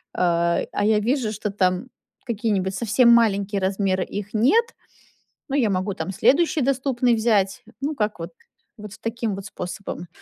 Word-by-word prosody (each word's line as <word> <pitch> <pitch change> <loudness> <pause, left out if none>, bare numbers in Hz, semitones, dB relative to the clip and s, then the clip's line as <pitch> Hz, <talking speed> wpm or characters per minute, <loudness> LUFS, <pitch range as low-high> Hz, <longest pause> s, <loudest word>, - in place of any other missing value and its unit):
Э, 170 -1 +1
а 205 - -1
я 215 0 +3
вижу, 235 0 0
что 210 -1 -4
там 185 +3 0 0.4
какие-нибудь 205 -5 -1
совсем 235 +4 +3
маленькие 200 -4 +3
размеры, 190 -1 0
их 205 0 -6
нет. 280 - +4 0.8
Но 275 - -1
я 240 -6 +2
могу 190 +1 -1
там 165 +3 -4
следующий 295 - +2
доступный 255 -2 +1
взять. 210 -4 +1 0.2
Ну, 295 +2 -2
как 210 -5 -2
вот, 170 +1 -6 0.5
вот 210 -1 -9
в - - -14
таким 230 -2 -3
вот 195 0 -8
способом. 180 -1 -6
210 Hz, 160 wpm, -23 LUFS, 190-235 Hz, 0.8 s, нет